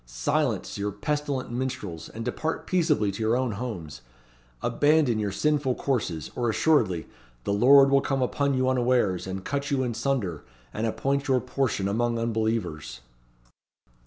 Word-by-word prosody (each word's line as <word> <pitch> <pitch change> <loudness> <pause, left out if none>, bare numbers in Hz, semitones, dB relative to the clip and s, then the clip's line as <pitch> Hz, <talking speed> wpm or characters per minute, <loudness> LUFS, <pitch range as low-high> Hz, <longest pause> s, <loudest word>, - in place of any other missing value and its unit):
Silence - - -1
your 100 +1 -1
pestilent 140 +5 -2
minstrels, 120 -10 -4
and 115 +1 -7
depart 155 +6 -3
peaceably 155 - +2
to 100 - -7
your 110 +2 +2
own 130 -2 0
homes. 100 - -6 0.6
Abandon 145 -6 +3
your 105 -2 -1
sinful 145 +2 +1
courses, 85 - -2
or 120 -1 0
assuredly 110 - +2 0.4
'the 100 - -1
Lord 135 +6 +6
will 140 0 +5
come 135 -1 0
upon 140 +2 0
you 130 0 +1
unawares, 120 -8 +1
and 95 0 -5
cut 140 +1 -2
you 135 -2 +1
in 120 -2 -2
sunder, 120 - -2 0.3
and 110 +1 -1
appoint 140 +5 -1
your 130 -2 +3
portion 125 -6 -1
among 115 +3 0
unbelievers.'" 110 - -2
120 Hz, 150 wpm, -26 LUFS, 100-135 Hz, 0.6 s, Lord